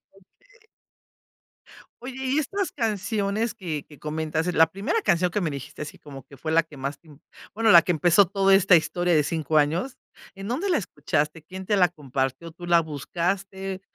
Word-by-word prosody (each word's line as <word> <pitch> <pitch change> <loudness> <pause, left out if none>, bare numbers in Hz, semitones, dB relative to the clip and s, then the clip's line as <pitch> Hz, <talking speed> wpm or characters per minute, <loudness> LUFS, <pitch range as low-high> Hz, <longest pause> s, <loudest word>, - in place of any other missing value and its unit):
Okey. 435 - -26 1.3
Oye, 255 +2 -7
¿y 265 +2 0
estas 390 +6 -2
canciones 215 -1 -1
que 155 -6 -5
que 150 -3 -16
comentas?, 155 +2 -2
eh, - - +1
la 160 0 +5
primera 200 - -1
canción 180 - +2
que 210 - 0
me 170 - 0
dijiste 140 -1 -8
así 150 - -7
como 135 -3 -11
que 140 - -15
fue 155 - -4
la 165 +1 +5
que 160 -2 -15
más 140 +2 -4
te 165 - -25
im 150 -2 -16 0.3
bueno, 225 +1 +3
la 170 - +10
que - - 0
empezó 175 +4 +5
toda 195 +1 +2
esta 195 -1 +6
historia 175 +2 +1
de 150 - +4
5 155 +1 -1
años, 165 - +1 0.4
¿en 195 +1 -7
dónde 315 +12 -1
la 345 - +3
escuchaste? 150 - -2
¿Quién 190 +3 -9
te 205 +2 +1
la 180 -2 +5
compartió? 140 -1 -4
¿Tú 175 +2 -10
la 170 -1 +5
buscaste? 190 +5 -3
175 Hz, 195 wpm, -25 LUFS, 155-200 Hz, 1.3 s, la